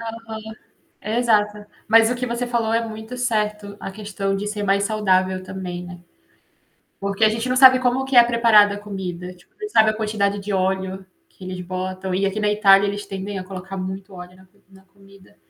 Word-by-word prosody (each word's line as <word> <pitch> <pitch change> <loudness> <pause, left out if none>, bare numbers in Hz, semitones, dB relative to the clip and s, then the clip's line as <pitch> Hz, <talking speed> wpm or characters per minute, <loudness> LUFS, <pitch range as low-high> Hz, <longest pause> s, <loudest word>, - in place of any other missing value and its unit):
Aham, 225 -1 -7 0.6
exata. 210 -2 0 0.2
Mas 225 +1 +5
o 250 - 0
que 250 +1 -3
você 240 +1 -3
falou 230 -2 -1
é 230 0 +1
muito 220 +2 -8
certo, 210 -4 -2
a - - -6
questão 195 -1 -4
de 205 - -4
ser 210 0 -4
mais 200 0 +2
saudável 190 -3 +1
também, 185 -1 -6
né. 175 -1 -10 1.0
Porque 200 +2 0
a - - +6
gente 225 +3 -2
não 255 - 0
sabe 260 0 +8
como 255 +1 0
que 265 -1 -2
é 240 - +9
preparada 230 -3 +4
a - - -6
comida, 185 -3 -6
tipo, 180 - -25
não 420 - -4
sabe 220 - +4
a - - -3
quantidade 210 -2 -1
de 200 +1 -5
óleo 190 0 -1 0.2
que 190 - -15
eles 185 0 -6
botam, 185 +1 -4
e 195 +2 0
aqui 195 +2 -2
na 210 0 +1
Itália 200 -1 +5
eles 205 +1 -5
tendem 195 +1 -5
a 185 - -6
colocar 190 0 -8
muito 190 +1 -6
óleo 180 0 -11
na 190 - -19
comi 200 +2 -33
na 190 0 -18
comida. 195 +1 -21
205 Hz, 205 wpm, -21 LUFS, 190-220 Hz, 1.0 s, é